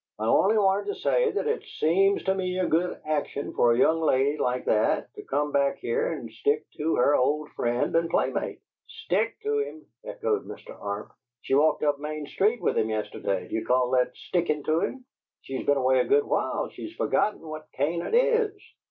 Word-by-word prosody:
"I 110 - -3
only 195 - +4
wanted 200 0 +2
to 200 - -4
say - - +2
that 415 +1 -2
it 455 +1 0 0.2
seems 195 +5 +3
to 190 - +2
me 185 -1 -2
a 185 - +1
good 175 +3 0
action 150 -2 -2
for 120 - +4
a 115 - +2
young 160 +5 +4
lady 140 -2 +2
like 125 0 -1
that 105 - +1
to - - -9
come 145 +2 -1
back 140 -1 +1
here 115 - -1
and 120 -8 -6
stick 145 +7 0
to 160 +2 0
her 140 +4 +4
old 150 +4 +1
friend 120 +5 -1
and 165 0 +2
playmate." - - -1 0.3
"STICK 450 -1 -2
to 435 0 0
him!" 330 -7 -5 0.2
echoed - - -2
Mr. - - -10
Arp. 100 0 -5 0.3
"She - - -3
walked 150 +2 +3
up 145 -1 +1
Main 150 0 -5
Street 210 +9 0
with - - +1
him 110 - 0
yesterday. 105 -3 -2
Do - - -11
you 110 - -1
call 125 +1 +2
that 125 -1 +1
stickin' 160 -5 -1
to 155 +2 +1
him? 255 +7 -3 0.4
She's 135 -1 -5
been 145 - +4
away 130 0 +3
a - - +2
good 430 +2 +3
while; - - -1
she's 330 - -9
forgotten 210 - 0
what 155 -1 -9
Canaan 170 - -1
IS. 470 -4 +3
155 Hz, 200 wpm, -26 LUFS, 130-200 Hz, 0.4 s, only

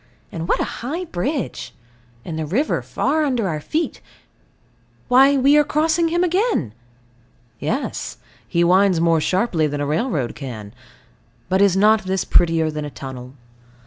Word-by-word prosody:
And 165 0 -5
what - - +1
a - - +1 0.2
high 320 +10 -3
bridge. 245 - -4 0.5
And 160 -2 -5
the 155 - -2
river 245 - 0
far 315 0 0
under 250 -8 0
our 155 -4 -2
feet. 315 - -3 1.1
Why 270 +3 +6
we 275 +2 +4
are 295 - +6
crossing 315 +3 +1
him 345 +2 +1
again! 360 - 0 0.9
Yes; - - -3 0.3
he 170 - +1
winds 185 0 +4
more 165 -1 +3
sharply 185 -3 +1
than 145 0 -4
a 145 - -1
railroad 150 - -1
can. 110 -7 -8 0.8
But 190 +1 +2
is 195 -2 +4
not 215 +1 +4
this 190 0 -1
prettier 165 -2 +2
than 150 0 -4
a 145 - -5
tunnel? 130 -1 -9
185 Hz, 150 wpm, -21 LUFS, -, 1.1 s, Why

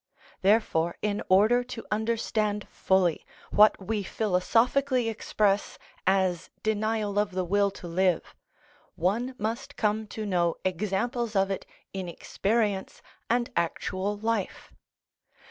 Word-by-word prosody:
Therefore, 185 -5 +2
in 210 0 0
order 215 +6 +5
to 245 -2 -8
understand 215 -1 0
fully 185 -4 +1 0.3
what 210 +1 +6
we 205 +2 -2
philosophically 225 +6 +1
express 205 -2 0 0.3
as 185 -3 +2
denial 215 -1 0
of 205 -2 0
the 185 0 -1
will 200 +3 +2
to 190 -2 -10
live, 180 0 +1 0.6
one 230 +9 0
must 235 +6 -3
come 215 0 0
to 215 +1 -5
know 175 -4 +1
examples 210 +5 -1
of 195 0 +2
it 195 - -4 0.3
in 190 -2 -4
experience 205 +2 -1 0.3
and 240 +1 +1
actual 185 +4 -1
life. 220 -2 -2
205 Hz, 115 wpm, -27 LUFS, 190-225 Hz, 0.6 s, what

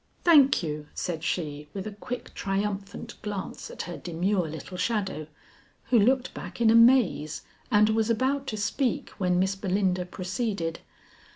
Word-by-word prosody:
"Thank 285 - +6
you," 150 -2 -4
said 165 -2 -3
she 150 -4 -3
with 195 - -4
a 215 - -4
quick 245 +4 -7
triumphant 200 +3 -3
glance 205 -3 -5
at - - -6
her 175 0 -6
demure 180 +1 -1
little 160 +4 -7
shadow, 195 -7 -1 0.6
who 240 - +6
looked 255 +4 +2
back - - -8
in 225 -2 +5
amaze 230 - +4 0.3
and 215 -2 +5
was 220 0 +1
about 265 +4 +1
to 215 - -3
speak 230 +4 -1
when 180 -2 +2
Miss 190 +1 +1
Belinda 190 -2 0
proceeded. 185 -2 -3
200 Hz, 150 wpm, -27 LUFS, 180-230 Hz, 0.6 s, Thank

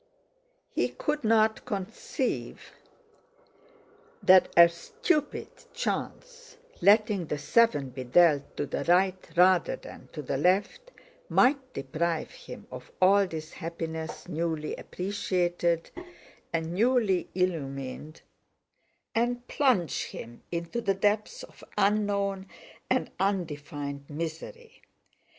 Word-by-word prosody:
He - - +1
could 300 -2 -3
not 220 0 +3
conceive 205 -2 -4 1.5
that 185 0 +6
a 170 0 +10
stupid 290 - -2 0.3
chance, - - -4 0.2
letting 205 -4 +4
the 150 - -2
seven 145 - +2
be 130 +1 -6
dealt 145 +1 +3
to - - -1
the - - -3
right 185 +1 +2
rather 180 0 +4
than - - -12
to 150 - -6
the 135 - -2
left, 195 - +1 0.4
might 260 0 +3
deprive 155 +4 -2
him - - -11
of 125 0 -9
all 195 +1 +5
this 160 -2 -7
happiness, 160 -1 -6
newly 160 -2 -2
appreciated 175 -3 -1 0.6
and 165 0 -2
newly 220 -3 +2
illumined, 150 -4 -3 0.9
and 240 +1 0
plunge 235 - +1
him 120 +1 -9
into 170 +7 -3
the 195 -3 +1
depths 210 - 0
of - - -14
unknown 200 -1 +1 0.4
and - - 0
undefined 145 -7 -3
misery. 165 - -7
180 Hz, 105 wpm, -28 LUFS, 160-215 Hz, 1.5 s, a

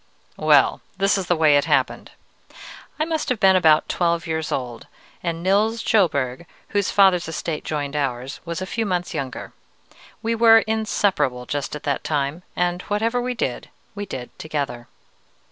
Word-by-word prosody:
Well, - - +4 0.2
this 195 +1 +3
is 190 -3 -2
the 175 - +2
way 155 -3 +5
it 145 - +1
happened. - - 0 0.9
I 310 - +2
must 320 -1 -2
have 250 -4 0
been 190 -2 +5
about 160 -4 +4
twelve 170 -1 0
years 160 -1 -3
old, 125 -3 -4 0.3
and 170 -1 -3
Nils 215 +4 +2
Sjöberg, 150 - +1 0.2
whose 205 -1 0
father's 190 -4 +4
estate 160 -1 -4
joined 145 -1 -3
ours, 135 -2 -3
was 170 +2 -4
a - - -3
few 225 +4 -2
months 180 -2 -2
younger. 130 -2 -5 0.7
We 230 +1 0
were 225 -1 +6
inseparable 200 - 0
just 145 +2 -3
at 150 - -8
that 140 - -1
time, 145 +2 -1
and 175 0 0
whatever 225 +4 0
we 250 0 -2
did, 225 - -3 0.2
we 205 -1 -6
did 125 -6 -7
together. 140 -6 -4
170 Hz, 160 wpm, -22 LUFS, 145-205 Hz, 0.9 s, were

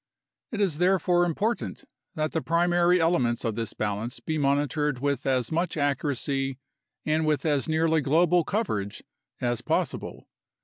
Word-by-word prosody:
It 220 - -4
is 170 -7 +1
therefore 180 -1 +3
important 205 +8 -2 0.3
that 155 -1 -1
the 160 - -1
primary 175 +2 +3
ele 165 0 +3
ments 120 -1 -1
of 115 - 0
this 115 -1 -4
balance 105 +3 -3
be 155 -1 -3
monitored 145 0 +1
with 140 0 -1
as 130 -3 +1
much 170 +1 -1
accuracy 135 -1 -1 0.5
and 155 +1 +1
with 150 -2 0
as 145 0 +1
nearly 160 0 +2
global 170 +5 +3
coverage 105 - -2 0.4
as 120 -2 0
possible. - - -2
150 Hz, 145 wpm, -26 LUFS, 130-170 Hz, 0.5 s, therefore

